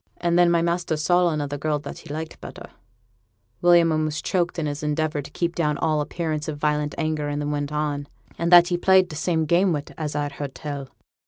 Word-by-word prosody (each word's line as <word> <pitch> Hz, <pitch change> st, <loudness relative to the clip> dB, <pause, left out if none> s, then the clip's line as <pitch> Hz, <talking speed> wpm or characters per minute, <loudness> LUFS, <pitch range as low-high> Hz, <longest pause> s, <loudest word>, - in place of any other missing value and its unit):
And 170 Hz, -1 st, 0 dB
then 175 Hz, 0 st, +5 dB
my 170 Hz, -1 st, +2 dB
master 170 Hz, -2 st, 0 dB
saw 175 Hz, +3 st, +3 dB
another 145 Hz, -2 st, -3 dB
girl, 150 Hz, +1 st, 0 dB
that 145 Hz, 0 st, -8 dB
he -, -, -14 dB
liked 160 Hz, +1 st, -6 dB
better' -, -, -10 dB, 0.9 s
William 175 Hz, -1 st, +5 dB
almost 155 Hz, 0 st, -1 dB
choked 175 Hz, -1 st, 0 dB
in 165 Hz, -, -1 dB
his 145 Hz, 0 st, -3 dB
endeavour 150 Hz, 0 st, -1 dB
to 140 Hz, -, -11 dB
keep 170 Hz, -1 st, -2 dB
down 150 Hz, -4 st, 0 dB
all 155 Hz, -1 st, +1 dB
appearance 155 Hz, 0 st, -3 dB
of 155 Hz, -2 st, -4 dB
violent 150 Hz, 0 st, -1 dB
anger, 155 Hz, -1 st, -1 dB
and 145 Hz, 0 st, -2 dB
then 145 Hz, 0 st, -2 dB
went 145 Hz, 0 st, -2 dB
on, 150 Hz, -1 st, -2 dB, 0.3 s
'and 170 Hz, +1 st, -1 dB
that 175 Hz, 0 st, +8 dB
he 175 Hz, -, +1 dB
played 185 Hz, 0 st, +4 dB
t' -, -, -6 dB
same 160 Hz, 0 st, 0 dB
game 175 Hz, +4 st, +3 dB
wi', 145 Hz, -3 st, -1 dB, 0.2 s
as 150 Hz, -2 st, -3 dB
I've 145 Hz, -1 st, -1 dB
heerd 140 Hz, -1 st, -6 dB
tell.' 140 Hz, -3 st, -6 dB
155 Hz, 220 wpm, -24 LUFS, 150-170 Hz, 0.9 s, that